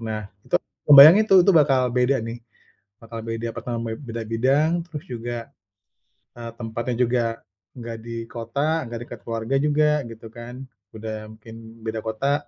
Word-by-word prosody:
Nah, 110 -2 -4 0.2
itu - - 0
aku - - -13
ngebayangin 165 +10 +10
itu 195 - +5
itu 195 - +5
bakal 135 -6 +3
beda 125 +2 +2
nih, 115 +1 -6 0.7
bakal 115 0 -8
beda, 115 +1 -4
pertam 115 -1 -5
be 110 +2 -5
beda 115 -4 -6
bidang, 135 +7 +2 0.2
terus 150 -4 -7
juga, 120 -1 -6 0.9
eee, 115 0 -6
tempatnya 120 +1 -3
juga 120 0 +1 0.5
nggak 115 -2 -7
di 115 - -5 0.2
kota, 140 +5 -2
nggak 115 0 -6
dekat 120 -1 -10
keluarga 115 +3 -2
juga 150 +1 +2 0.2
gitu 115 0 -11
kan, 120 +2 -9 0.3
udah 110 0 -5 0.2
mungkin 115 +1 -13 0.3
beda 110 0 -3
kota. 140 +7 -1
120 Hz, 160 wpm, -23 LUFS, 115-140 Hz, 0.9 s, ngebayangin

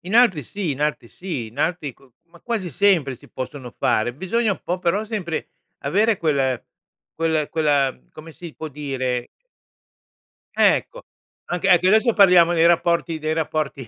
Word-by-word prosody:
In 185 +5 -6
altri 225 -11 +5
sì, 185 - -4
in 140 0 -4
altri 150 -5 -1
sì. 165 -9 -5
In 115 +5 -14
altri 155 -2 -1
co 130 +1 -24 0.2
ma 170 0 -19
quasi 225 -7 -3
sempre 160 -4 +2
si - - -18
possono 130 -1 -7
fare. 110 +3 +1
Bisogna 200 - 0
un - - -8
po', 180 +1 -2
però, 185 +4 0
sempre 200 -7 -4 0.3
avere 205 +10 +1
quel 135 -6 0 0.5
quel 160 -2 0
quella, 145 -4 +1 0.2
come 160 +1 -11
si 170 -1 -10
può 160 - -7
dire 130 -4 -3 1.3
Ecco, - - +2 0.4
anche 180 +2 -1
anche 180 -1 +5
adesso 220 +4 +4
parliamo 180 -5 +6
dei 165 -1 +4
rapporti 170 -1 +2
dei 155 0 -2
rapporti 155 -4 -3
160 Hz, 160 wpm, -22 LUFS, 140-185 Hz, 1.3 s, parliamo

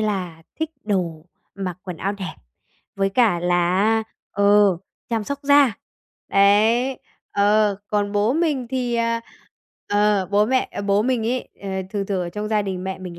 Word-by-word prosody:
là 185 -6 -2 0.2
thích 320 -1 -1
đồ, 175 -6 -2 0.3
mặc 185 -3 -5
quần 180 -3 -6
áo 195 +4 -2
đẹp, 190 -5 -6 0.6
với 195 0 +1
cả 205 -5 +3
là 175 +1 +2
á, 220 +2 +3 0.3
ờ, 200 -2 +4 0.3
chăm 225 -3 -1
sóc 280 +4 -4
da. 285 -3 +5 0.6
Đấy. 220 +6 +3 0.3
Ờ, 205 0 +3
còn 205 -1 0
bố 210 +3 +2
mình 295 -6 0
thì, 250 -2 -1
à, 230 0 0 0.7
ờ, 205 -2 +2
bố 205 +1 +3
mẹ 260 +1 +1
ờ, - - -4
bố 200 +1 +2
mình 245 -2 0
ấy, 250 +2 -2
ờ, 195 - -5 0.2
thường 200 -2 -2
thường 195 -2 -1
ở 175 - -4
trong 210 +3 -4
gia 215 -1 +1
đình 190 -2 -4
mẹ 190 0 -4
mình 180 -2 -8
205 Hz, 175 wpm, -22 LUFS, 190-230 Hz, 0.7 s, da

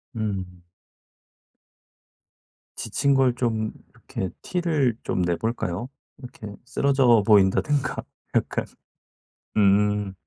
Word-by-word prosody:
음. 95 -5 -4 2.1
지친 140 0 0
걸 130 -2 +4
좀 110 -3 -1 0.2
이렇게 95 - -6
티를 155 -10 0
좀 90 - -1
내 85 -1 +1
볼까요? 110 +1 -3 0.3
이렇게 125 -4 -10 0.2
쓰러져 130 -6 +3
보인다든가 105 +7 +3 0.4
약간. - - 0 0.9
음. 105 0 +3
110 Hz, 170 characters per minute, -24 LUFS, 100-130 Hz, 2.1 s, 걸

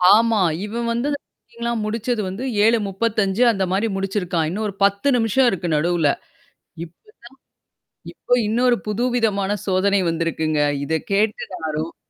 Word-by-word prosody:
ஆமா. 225 -2 +3 0.2
இவன் 235 +2 -3
வந்து 240 +5 -1
செக்கிங்லா 235 -4 -8
முடிச்சது 230 +1 -2
வந்து 200 +7 -6 0.2
7:35 215 0 +1
அந்த 195 -3 -1
மாரி 205 +4 +1
முடிச்சிருக்கான். 185 -4 -1
இன்னும் 210 +5 -3
ஒரு 200 - -6
10 200 +6 0
நிமிஷம் 240 +3 +2
இருக்கு 180 -2 -3
நடுவுல. 165 -1 +2 0.7
இப்பதான் 425 - -16 0.9
இப்ப 245 - 0
இன்னொரு 240 +2 +3
புதுவிதமான 215 -3 0 0.2
சோதனை 195 +1 +2
வந்திருக்குங்க. 160 -2 -1 0.2
இத 160 - -3 0.2
கேட்டு 210 +2 +1
நான் 160 -4 -4
ரொம்ப 160 +2 -5
205 Hz, 130 wpm, -21 LUFS, 185-230 Hz, 0.9 s, ஆமா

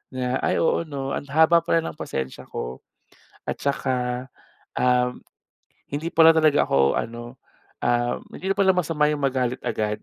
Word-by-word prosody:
na 125 0 -1
ay - - 0
oo 165 0 +1
no 135 -2 -4
ang 145 - -4
haba 160 +4 +5
pala 165 -1 +1
ng - - -20
pasensya 65 -1 -5
ko. 65 +2 -6 0.7
At - - -1
saka, 125 -2 -2 0.5
um, 125 0 +1 0.6
hindi 155 +4 -4
pala 165 0 +6
talaga 155 -2 +4
ako 70 0 +3
ano, 120 +2 -6 0.4
um, 120 0 +1 0.2
hindi 190 +1 -4
na 195 - 0
pala 190 -1 +4
masama 160 -4 +1
yung 145 - -6
magalit 130 -2 0
agad 105 -1 -2
135 Hz, 155 wpm, -24 LUFS, 125-160 Hz, 0.7 s, pala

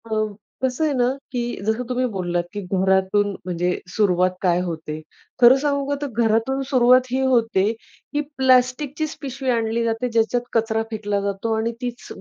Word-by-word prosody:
अ, - - -13 0.5
कसं 260 +4 0
आहे 300 - +1
ना, 245 -2 +2 0.2
की 245 - -1 0.2
जसं 220 +3 0
तुम्ही 255 0 0
बोललात 175 -2 -1
की 205 - -4
घरातून 190 +2 +1 0.2
म्हणजे 180 0 -1 0.2
सुरुवात 185 -3 +3
काय 175 -2 +2
होते. 160 -3 -5 0.4
खरं 245 +2 +9
सांगू 280 -1 0
का 285 - +1
तर 290 - -1 0.2
घरातून 225 +5 +1
सुरुवात 255 -1 +5
ही 260 - +1
होते 225 -6 +2 0.4
की 295 - +1 0.2
प्लास्टिकचीच 265 +4 +2
पिशवी 270 -1 -4
आणली 230 -1 +1
जाते 230 +2 -1
ज्याच्यात 230 +1 +1
कचरा 225 -1 +1
फेकला 205 -2 -1
जातो 200 +3 -2
आणि 225 +1 0
तीच 245 - -5
230 Hz, 160 wpm, -22 LUFS, 200-255 Hz, 0.5 s, खरं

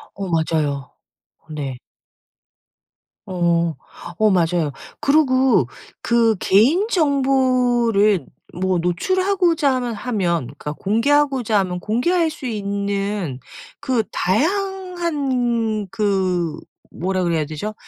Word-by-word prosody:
어 195 -1 -5
맞아요. 155 -4 -1 0.5
어 - - -37
네. 140 -4 -4 1.5
어. 170 -2 +1 0.4
어 215 -1 +4
맞아요. 170 -4 +1 0.3
그리고 260 - +3 0.4
그 230 -2 +3
개인정보를 255 - +2 0.3
뭐 185 -1 +1
노출하고자 340 - +1
하면 245 -2 -2
하면 200 -7 -1
그러니까 145 +3 -7
공개하고자 245 - +1
하면 180 -2 -2
공개할 320 - +1
수 300 -3 -8
있는 200 - -2 0.4
그 260 -5 0
다양한 280 - -1
그 185 -5 0 0.3
뭐라 185 +1 -2
그래야 165 -3 0
되죠 155 +8 -5
215 Hz, 200 characters per minute, -20 LUFS, 180-270 Hz, 1.5 s, 어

